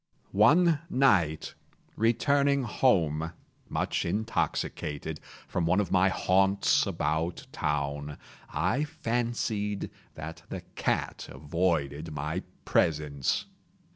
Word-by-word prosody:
One 150 - +5
night, 90 - +2 0.4
returning 140 +5 +3
home, 85 - +2 0.4
much - - -1
intoxicated, 80 -6 -2 0.3
from 85 -2 -1
one 90 +4 +3
of 105 - -1
my 95 +1 +4
haunts 95 +1 +3
about 80 +3 -1
town, 75 0 -2 0.3
I 140 +5 +1
fancied 115 -8 -2 0.2
that 80 +1 -7
the - - -5
cat - - -1
avoided 75 -1 -1
my 75 +5 -2 0.2
presence. 75 -5 +1
90 Hz, 90 wpm, -29 LUFS, 75-115 Hz, 0.4 s, One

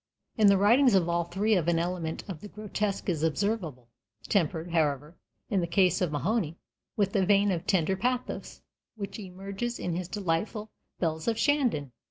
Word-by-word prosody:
In 215 -2 +5
the 200 -1 +6
writings 235 +4 +5
of 180 -3 +3
all 170 0 +1
three 200 +6 0
an 170 -3 +2
element 170 -1 -2
of 175 -6 -7
the 210 - -8
grotesque 210 -1 -3
is 165 -5 0
observable, 160 - -1 0.4
tempered, 170 -2 0
however, 150 -1 0 0.3
in 195 -3 +1
the 170 - -1
case 180 +1 +3
of 180 -4 +1
Mahony, 165 - -1 0.4
with 200 -1 +1
a 195 - +4
vein 200 +1 +4
of 180 0 -3
tender 190 -1 +2
pathos 250 +5 -3 0.3
which 200 -1 -6
emerges 195 +5 -5
in 175 -2 -3
his 180 0 -3
delightful 205 +3 -2 0.3
"Bells 160 -2 -1
of 225 -1 +1
Shandon." 245 - +1
190 Hz, 170 wpm, -28 LUFS, 165-210 Hz, 0.4 s, the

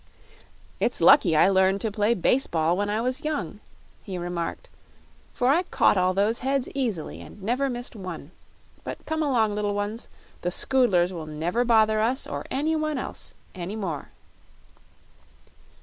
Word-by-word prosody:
"It's - - 0
lucky 265 - +6
I 155 - +6
learned 190 0 +3
to 220 - 0
play 210 +3 +1
base 250 +8 +2
ball 165 +1 +1
when 205 +2 -1
I 215 +2 0
was 255 +5 -2
young," 215 - -3 0.4
he 190 -3 -6
remarked, 175 - -4 0.6
"for 245 - 0
I 315 +6 +4
caught 365 - +2
all 185 -1 +2
those 210 +4 +1
heads 270 0 0
easily 235 - -3
and 205 - -13
never 255 +6 0
missed 245 -1 -4
one. 180 -6 -7 0.5
But - - -7
come 315 0 -2
along, 235 -8 +2
little 205 -1 -1
ones; 205 +3 -3 0.3
the 175 - -1
Scoodlers 190 -4 +3
will 160 -3 -6
never 165 +9 -1
bother 220 -2 +3
us 240 +5 0
or - - -6
anyone 310 +1 0
else - - -6 0.2
any 185 +2 -5
more." 185 -9 -4
215 Hz, 155 wpm, -25 LUFS, 185-255 Hz, 0.6 s, lucky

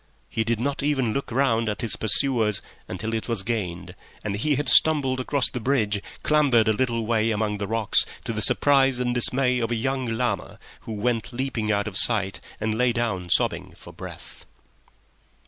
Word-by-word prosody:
He 110 - -1
did 115 0 -1
not 140 +4 -2
even 135 -6 0
look 140 - -4
round 115 -3 +1
at 105 - -4
his 115 - +2
pursuers 110 -2 +1 0.2
until 110 +5 -5
it 110 - -3
was 115 -5 -1
gained, 95 -6 -4 0.3
and 100 -2 -3
he 145 +8 0
had 145 +1 -2
stumbled 135 -2 +4
across 130 +1 +1
the 125 - -4
bridge, 110 -5 0 0.2
clambered 140 -7 +3
a 110 - +3
little 115 -1 -1
way 110 0 +1
among 105 -1 -1
the 100 - -3
rocks, 110 -1 +4 0.2
to 115 - -4
the 110 - -3
surprise 135 +1 +3
and 125 -1 -1
dismay 125 +1 +3
of 115 -1 -2
a 120 - -1
young 130 +2 -2
llama, 115 -4 -3 0.3
who - - -3
went 115 +2 -2
leaping 120 -4 -2
out 100 0 0
of 100 -2 -3
sight, 100 -4 +1 0.2
and 110 0 -1
lay 125 -1 +3
down 105 -7 -2
sobbing - - 0
for - - -13
breath. - - -11
115 Hz, 185 wpm, -24 LUFS, 110-130 Hz, 0.3 s, stumbled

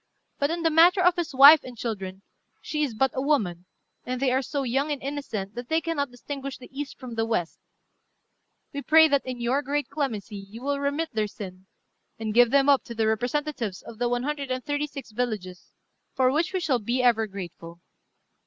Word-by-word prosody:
But 285 - +1
in 335 +1 -2
the 325 - +3
matter 340 +5 +6
of 360 0 +5
his 345 -3 -2
wife 280 +3 +9
and 250 -2 -10
children, 195 -4 -5 0.4
she 300 - -3
is 270 -7 -1
but 265 +3 +2
a 260 - -2
woman, 205 - 0 0.4
and 255 0 -3
they 265 -1 +2
are 260 +1 +2
so 280 +1 -3
young 270 +4 0
and 290 - -2
innocent 265 -8 -5
that 240 0 -7
they 320 0 +3
cannot 320 -4 -2
distinguish 275 +2 -7
the 255 - -14
east 285 0 -5
from 255 -3 -8
the 225 0 0
west: 220 -7 -2 1.1
we 280 - -4
pray 320 +2 +6
that 280 -2 +1
in 255 -1 -4
your 245 +4 +1
great 290 +1 -2
clemency 235 -8 -3
you 200 +5 -10
will 280 0 -1
remit 285 +3 -1
their 215 -1 0
sin, 190 -2 -10 0.5
and 220 -1 -3
give 240 +1 +6
them 275 +2 +3
up 280 -2 +5
to 235 - -8
the 225 0 +1
representatives 240 -1 -2
of 230 -1 -11
the 245 0 +1
one 245 0 -1
hundred 285 -1 -3
and 255 0 -3
thirty 290 +1 -1
six 275 -5 -9
villages, 210 -6 -4 0.4
for 260 -1 +3
which 320 +5 0
we 375 - -1
shall 275 -8 +1
be 240 +4 -1
ever 225 -3 +3
grateful. 170 -3 -9
255 Hz, 210 wpm, -26 LUFS, 225-285 Hz, 1.1 s, wife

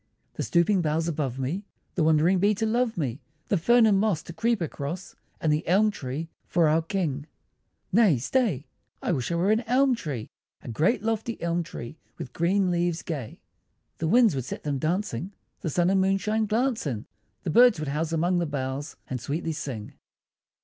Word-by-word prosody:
The - - -5
stooping 175 +2 +2
boughs 160 +1 0
above 145 -6 -2
me, 145 +10 -2 0.3
The 170 - +1
wandering 160 +4 +4
bee 205 +3 +3
to 220 - -1
love 230 0 +1
me, 135 -4 -2 0.3
The 200 - +3
fern 235 +6 +5
and 205 -3 +4
moss 200 -6 +1
to 170 - -9
creep 230 +4 +1
across, 165 +2 -5 0.2
And 155 -3 +2
the 150 - 0
Elm 205 +5 +4
tree 145 -1 -5 0.2
for 170 -2 +3
our 155 +2 +3
King! 160 -5 -2 0.6
Nay 200 - +5
stay! 160 - 0 0.4
I - - 0
wish 135 -2 -1
I - - +1
were 180 +5 +2
an 220 +1 +3
Elm 260 +2 +4
tree, 150 - -5 0.3
A - - -8
great 175 - +1
lofty 225 +1 -2
Elm 170 0 0
tree, 155 -3 -8 0.2
with 125 - -7
green 185 +2 +2
leaves 175 -1 0
gay! 140 -9 -5 0.6
The 160 - 0
winds 230 +1 +5
would 130 -3 -3
set - - -6
them 145 -2 -1
dancing, 175 - -2 0.3
The 165 - -3
sun 175 +4 +2
and 195 -1 +3
moonshine 210 +3 +1
glance 235 - 0
in, 115 -6 -3 0.4
The 170 - -1
birds 245 +4 +6
would 155 -2 -3
house 155 +3 -1
among 175 +2 +1
the 170 - 0
boughs, 140 0 -4
And 125 -2 -4
sweetly 160 +6 -2
sing! 125 -8 -5
170 Hz, 190 wpm, -26 LUFS, 150-205 Hz, 0.6 s, birds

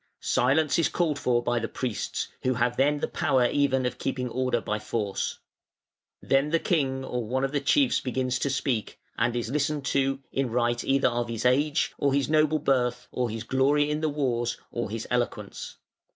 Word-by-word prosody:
Silence 145 +6 +2
is 165 - +3
called 160 -5 0
for 120 -1 +1
by 120 0 +1
the 115 - -2
priests, 120 -3 -3
who 130 0 +1
have 120 +1 +1
then 145 +3 +2
the - - 0
power 130 -3 +2
even 130 0 +2
of 125 0 -3
keeping 130 -1 -2
order 125 0 0
by 105 -1 -3
force. 105 -2 -2 0.9
Then 135 +2 +2
the 165 - +3
king 135 -6 0
or 125 -2 -3
one 130 +3 -1
of 135 - 0
the 145 -1 0
chiefs 265 - +3
begins 130 0 -1
to 140 - 0
speak, 130 -4 -2 0.2
and 120 +1 0
is 120 -1 -2
listened 145 0 -1
to 135 0 +1
in 135 -2 -1
right 120 0 0
either 135 -1 +3
of 120 0 -2
his 115 0 -4
age, 145 +5 +2
or 140 -1 +2
his 140 -1 +1
noble 155 0 +3
birth, 125 -4 0
or 125 -2 -1
his 110 0 -5
glory 140 +4 +2
in 150 +1 -1
the 155 - +1
wars, 120 -5 -1
or 120 -3 -3
his 110 +1 -5
eloquence. 125 -1 -3
130 Hz, 195 wpm, -27 LUFS, 120-145 Hz, 0.9 s, is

